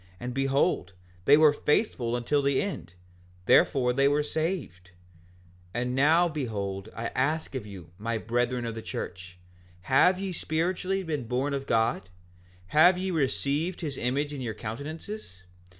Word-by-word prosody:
And 125 +1 -5
behold, 135 -8 +1 0.3
they 145 - +7
were 155 -1 +6
faithful 145 - 0
until 125 +4 +1
the 140 -1 +2
end; 135 - -4 0.5
therefore 125 +3 +4
they 135 +2 +3
were 145 +1 +2
saved. 145 - -3 0.9
5:14 120 - 0
And 125 0 -2
now 155 +6 +4
behold, 105 - -4
I 115 - -3
ask 150 +5 -1
of 125 -6 -5
you, 95 -5 -11
my 115 +2 -2
brethren 120 +2 -1
of 115 - -3
the 115 - -6
church, 90 -3 -7 0.4
have 160 - +4
ye 195 -1 -3
spiritually 180 +4 -1
been 150 -8 -3
born 130 +4 -1
of 135 0 -3
God? 115 -4 +1 0.6
Have 175 - +6
ye 190 +1 -2
received 155 +3 -1
his 150 -5 -3
image 140 +5 -1
in 140 - -5
your 110 -3 -4
countenances? 140 - -7
135 Hz, 150 wpm, -28 LUFS, 115-155 Hz, 0.9 s, they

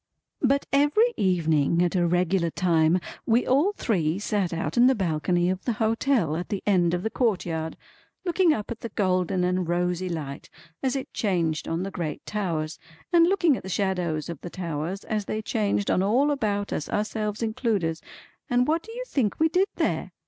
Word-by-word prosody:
But 275 +1 +2
every 295 +13 +4
evening 170 -3 +2
at 175 +1 0
a 175 -1 +3
regular 175 0 +1
time 165 -1 +2 0.3
we 235 +2 +3
all 290 +10 +3
three 175 - 0
sat 205 -3 -1
out 165 -2 -3
in 240 +1 +6
the 265 - +4
balcony 175 -2 0
of 185 +1 -1
the 240 - 0
hotel 220 - +1
at 175 +2 -4
the 200 - -3
end 180 -4 +3
of 175 - -4
the 220 - -1
courtyard, 175 -9 -1 0.5
looking 355 -1 +3
up 215 -8 -2
at 235 - -5
the 230 - -6
golden 185 -2 0
and 180 -1 0
rosy 180 +1 0
light 145 -5 -5 0.3
as 265 0 0
it 270 - -5
changed 170 -7 0
on 165 +2 -1
the 195 - -4
great 165 -6 -4
towers, 165 -7 -3 0.3
and 335 -1 +6
looking 350 -6 +3
at - - -6
the 190 - -8
shadows 180 -5 -1
of 170 -4 -7
the 175 - -6
towers 170 +1 -4
as 215 -2 -2
they 215 - -2
changed 210 -2 0
on - - +2
all 250 +9 +3
about 205 -7 -1
us 150 - -3
ourselves 210 +1 -2
included, 210 -8 -1 0.5
and 245 0 +2
what 320 +2 +2
do 450 - -12
you - - -4
think 255 - -1
we 320 +1 +4
did 370 +4 +2
there? - - -1
195 Hz, 190 wpm, -26 LUFS, 170-235 Hz, 0.5 s, in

